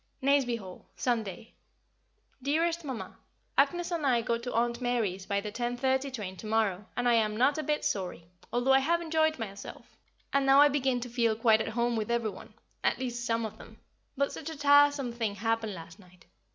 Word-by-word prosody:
Nazeby 275 Hz, -3 st, +3 dB
Hall, 190 Hz, -4 st, -11 dB
Sunday. 225 Hz, -4 st, -2 dB, 0.9 s
Dearest 330 Hz, +5 st, 0 dB
Mamma, 260 Hz, -6 st, -6 dB, 0.4 s
Agnès 350 Hz, 0 st, +2 dB
and 335 Hz, -3 st, -2 dB
I 245 Hz, -4 st, +2 dB
go 235 Hz, 0 st, 0 dB
to 245 Hz, +1 st, -5 dB
Aunt 235 Hz, +1 st, 0 dB
Mary's 220 Hz, -7 st, -1 dB
by 200 Hz, -1 st, 0 dB
the 210 Hz, 0 st, -5 dB
10:30 260 Hz, +4 st, -1 dB
train 205 Hz, -7 st, -5 dB
to 215 Hz, -, -8 dB
morrow, 210 Hz, -3 st, 0 dB
and 245 Hz, 0 st, +1 dB
I 240 Hz, -, +5 dB
am 215 Hz, -2 st, +2 dB
not 275 Hz, +5 st, +3 dB
a -, -, 0 dB
bit 300 Hz, +1 st, -1 dB
sorry, 180 Hz, -4 st, -2 dB, 0.3 s
although 245 Hz, +2 st, +2 dB
I 270 Hz, -, +6 dB
have 335 Hz, +5 st, +1 dB
enjoyed 315 Hz, -1 st, +1 dB
myself, 200 Hz, -4 st, -8 dB, 0.4 s
and 275 Hz, 0 st, +3 dB
now 270 Hz, +1 st, +6 dB
I 290 Hz, 0 st, +8 dB
begin 265 Hz, -3 st, 0 dB
to 245 Hz, -, -4 dB
feel 230 Hz, -2 st, +1 dB
quite 225 Hz, -1 st, +4 dB
at -, -, -3 dB
home 240 Hz, 0 st, +1 dB
with 220 Hz, 0 st, -2 dB
every 235 Hz, -2 st, 0 dB
one 205 Hz, +2 st, -13 dB, 0.3 s
at -, -, +2 dB
least, 240 Hz, -1 st, -4 dB
some 230 Hz, 0 st, 0 dB
of 220 Hz, 0 st, -8 dB
them; -, -, -13 dB, 0.4 s
but 280 Hz, +1 st, +1 dB
such 320 Hz, -, -6 dB
a 320 Hz, -, -7 dB
tiresome 285 Hz, -2 st, +4 dB
thing 225 Hz, -4 st, -2 dB
happened 225 Hz, 0 st, -1 dB
last 165 Hz, +1 st, -11 dB
night. 180 Hz, -3 st, -19 dB
240 Hz, 200 wpm, -29 LUFS, 220-275 Hz, 0.9 s, I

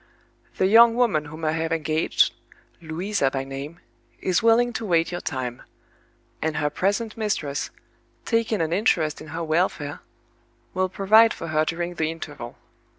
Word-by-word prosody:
"The 185 Hz, -, +2 dB
young 230 Hz, +3 st, +7 dB
woman 220 Hz, -12 st, +2 dB
whom 155 Hz, +2 st, -7 dB
I 155 Hz, -, +2 dB
have 160 Hz, 0 st, -2 dB
engaged 160 Hz, 0 st, +1 dB, 0.5 s
(Louisa 165 Hz, -1 st, -1 dB
by 135 Hz, 0 st, -3 dB
name) 135 Hz, +5 st, -7 dB, 0.4 s
is 185 Hz, +2 st, +1 dB
willing 235 Hz, +1 st, +4 dB
to -, -, -4 dB
wait 165 Hz, -2 st, +2 dB
your 175 Hz, -, -4 dB
time; 125 Hz, -4 st, -4 dB, 0.8 s
and 160 Hz, -1 st, -1 dB
her 150 Hz, -1 st, 0 dB
present 205 Hz, +7 st, -1 dB
mistress, 165 Hz, -10 st, -2 dB, 0.6 s
taking 230 Hz, -4 st, +1 dB
an 165 Hz, 0 st, 0 dB
interest 165 Hz, -6 st, +1 dB
in -, -, -10 dB
her 165 Hz, +2 st, -4 dB
welfare, 155 Hz, -3 st, -1 dB, 0.7 s
will 185 Hz, 0 st, 0 dB
provide 215 Hz, +4 st, +5 dB
for 165 Hz, -, -6 dB
her 155 Hz, 0 st, +2 dB
during 175 Hz, +2 st, -3 dB
the 160 Hz, -2 st, -1 dB
interval. 145 Hz, -7 st, -8 dB
165 Hz, 150 wpm, -24 LUFS, 155-200 Hz, 0.8 s, young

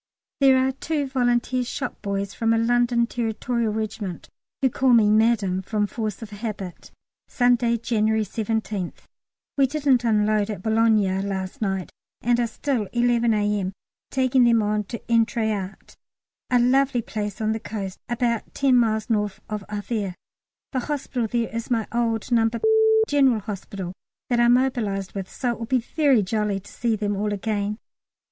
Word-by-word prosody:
There 270 Hz, -2 st, +6 dB
are 260 Hz, 0 st, +2 dB
two 290 Hz, +2 st, -2 dB
Volunteer 250 Hz, -1 st, +1 dB
shop 245 Hz, -, -5 dB
boys 200 Hz, 0 st, -3 dB
from 225 Hz, -1 st, +1 dB
a -, -, +2 dB
London 240 Hz, +1 st, +2 dB
Territorial 235 Hz, 0 st, -1 dB
Regiment, 210 Hz, -4 st, -4 dB, 0.3 s
who 265 Hz, -, +3 dB
call 260 Hz, 0 st, +3 dB
me 215 Hz, -3 st, +5 dB
"Madam" 215 Hz, -4 st, +2 dB
from 210 Hz, +2 st, -1 dB
force 215 Hz, 0 st, -4 dB
of 220 Hz, -, -9 dB
habit. 205 Hz, -4 st, -6 dB, 0.4 s
Sunday, 245 Hz, -1 st, +2 dB
January 220 Hz, -1 st, +1 dB
17th. 215 Hz, -3 st, -3 dB, 0.5 s
We 270 Hz, -, +5 dB
didn't 275 Hz, -3 st, +2 dB
unload 215 Hz, -2 st, +2 dB
at 200 Hz, -4 st, -5 dB
Boulogne 220 Hz, -4 st, +2 dB
last 190 Hz, 0 st, -4 dB
night, 190 Hz, -3 st, -2 dB, 0.3 s
and 240 Hz, +1 st, +1 dB
are 240 Hz, -, +1 dB
still 235 Hz, -3 st, -2 dB
(11 235 Hz, -1 st, +2 dB
A.M.) 205 Hz, -2 st, 0 dB, 0.4 s
taking 260 Hz, -1 st, +3 dB
them 230 Hz, -2 st, +4 dB
on 210 Hz, 0 st, 0 dB
to 235 Hz, -, -5 dB
Êtretat, 220 Hz, -4 st, -1 dB, 0.5 s
a 250 Hz, -, +4 dB
lovely 255 Hz, 0 st, +3 dB
place 210 Hz, -2 st, -4 dB
on 215 Hz, 0 st, 0 dB
the 220 Hz, -, -1 dB
coast, 200 Hz, -4 st, -6 dB
about 235 Hz, -1 st, -1 dB
ten 270 Hz, -2 st, +4 dB
miles 220 Hz, -2 st, +1 dB
north 210 Hz, -3 st, -1 dB
of 210 Hz, -1 st, -3 dB
Havre. 205 Hz, -2 st, -3 dB, 0.6 s
The 260 Hz, -, -1 dB
hospital 260 Hz, -3 st, -2 dB
there 230 Hz, 0 st, -2 dB
is 230 Hz, 0 st, -4 dB
my 230 Hz, -3 st, 0 dB
old 235 Hz, 0 st, -1 dB
No. 225 Hz, -1 st, +4 dB, 0.6 s
General 265 Hz, -6 st, +3 dB
Hospital, 195 Hz, -3 st, -6 dB, 0.4 s
that 240 Hz, -, +3 dB
I 240 Hz, -, +5 dB
mobilised 240 Hz, -6 st, +1 dB
with, 195 Hz, -2 st, -5 dB
so 250 Hz, -2 st, -1 dB
it 235 Hz, -, -6 dB
will 230 Hz, -, -5 dB
be 260 Hz, -, +2 dB
very 260 Hz, -1 st, +2 dB
jolly 210 Hz, 0 st, -1 dB
to 200 Hz, -, -15 dB
see 230 Hz, -1 st, 0 dB
them 205 Hz, -1 st, -1 dB
all 210 Hz, +1 st, -1 dB
again. 205 Hz, 0 st, -2 dB
225 Hz, 160 wpm, -24 LUFS, 210-240 Hz, 0.6 s, There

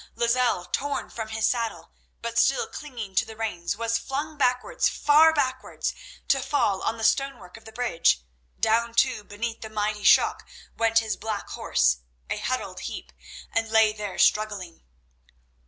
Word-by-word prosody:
Lozelle, 235 Hz, -6 st, +1 dB
torn 285 Hz, +7 st, -3 dB
from 225 Hz, -2 st, -5 dB
his 220 Hz, 0 st, -1 dB
saddle, 230 Hz, -2 st, -1 dB, 0.3 s
but 235 Hz, 0 st, 0 dB
still 270 Hz, -, +3 dB
clinging 235 Hz, -10 st, -7 dB
to -, -, +3 dB
the 220 Hz, -, -10 dB
reins, 200 Hz, -4 st, -3 dB
was 230 Hz, 0 st, 0 dB
flung 295 Hz, +3 st, -4 dB
backwards, 250 Hz, -3 st, +1 dB
far 305 Hz, +2 st, +5 dB
backwards, 260 Hz, -4 st, -2 dB, 0.3 s
to 275 Hz, -, +3 dB
fall 205 Hz, -9 st, +1 dB
on 225 Hz, -, -1 dB
the 225 Hz, -, -6 dB
stonework 275 Hz, -6 st, 0 dB
of 225 Hz, -, -14 dB
the 220 Hz, -, -10 dB
bridge. 220 Hz, -, +2 dB, 0.4 s
Down, 230 Hz, +1 st, +2 dB
too, 245 Hz, -3 st, +2 dB
beneath 225 Hz, +3 st, -5 dB
the 220 Hz, -, -7 dB
mighty 210 Hz, -1 st, -2 dB
shock -, -, +4 dB, 0.3 s
went 225 Hz, 0 st, +2 dB
his 220 Hz, -1 st, +1 dB
black 215 Hz, -1 st, -4 dB
horse, -, -, +1 dB, 0.3 s
a -, -, 0 dB
huddled -, -, -3 dB
heap, -, -, -7 dB, 0.4 s
and 225 Hz, 0 st, 0 dB
lay 220 Hz, -1 st, +4 dB
there 210 Hz, -2 st, -6 dB
struggling. 205 Hz, -5 st, +1 dB
225 Hz, 155 wpm, -26 LUFS, 210-250 Hz, 0.4 s, far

